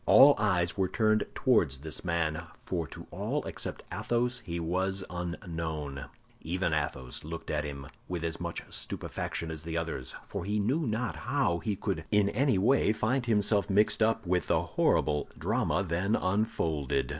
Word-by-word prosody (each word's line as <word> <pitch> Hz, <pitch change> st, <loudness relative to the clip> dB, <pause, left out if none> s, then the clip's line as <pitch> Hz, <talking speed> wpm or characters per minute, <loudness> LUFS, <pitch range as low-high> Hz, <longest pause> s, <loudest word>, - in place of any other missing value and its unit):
All 140 Hz, +2 st, +9 dB
eyes 90 Hz, -5 st, +2 dB
were 95 Hz, -2 st, +1 dB
turned 110 Hz, +2 st, +2 dB
towards 85 Hz, -, +3 dB
this 75 Hz, +3 st, -4 dB
man—for 85 Hz, 0 st, -2 dB
to -, -, -10 dB
all -, -, -2 dB
except -, -, -5 dB
Athos 120 Hz, +5 st, 0 dB
he 85 Hz, -1 st, -4 dB
was 95 Hz, +3 st, 0 dB
unknown. 80 Hz, -5 st, -4 dB, 0.4 s
Even 90 Hz, 0 st, -1 dB
Athos 65 Hz, -4 st, -2 dB
looked 85 Hz, +2 st, -6 dB
at 75 Hz, -1 st, 0 dB
him 70 Hz, -1 st, -6 dB, 0.2 s
with 90 Hz, -2 st, -3 dB
as 80 Hz, 0 st, -2 dB
much 85 Hz, -1 st, -4 dB
stupefaction 80 Hz, -1 st, -3 dB
as 80 Hz, -2 st, -5 dB
the 80 Hz, +1 st, -3 dB
others, 80 Hz, -6 st, -3 dB
for -, -, -5 dB
he 105 Hz, +3 st, 0 dB
knew 135 Hz, +9 st, +1 dB
not 115 Hz, +2 st, -1 dB
how 120 Hz, -9 st, +1 dB
he 105 Hz, +1 st, -1 dB
could 80 Hz, -3 st, -2 dB
in 105 Hz, -1 st, +4 dB
any 130 Hz, 0 st, +2 dB
way 110 Hz, +3 st, +4 dB
find 120 Hz, +4 st, 0 dB
himself 105 Hz, -2 st, +2 dB
mixed 105 Hz, +3 st, +4 dB
up 110 Hz, -1 st, +2 dB
with 90 Hz, -1 st, +1 dB
the -, -, +2 dB
horrible 75 Hz, -2 st, +1 dB
drama 100 Hz, -, +1 dB
then 90 Hz, +6 st, +1 dB
unfolded. 80 Hz, -, 0 dB
90 Hz, 160 wpm, -30 LUFS, 80-110 Hz, 0.4 s, All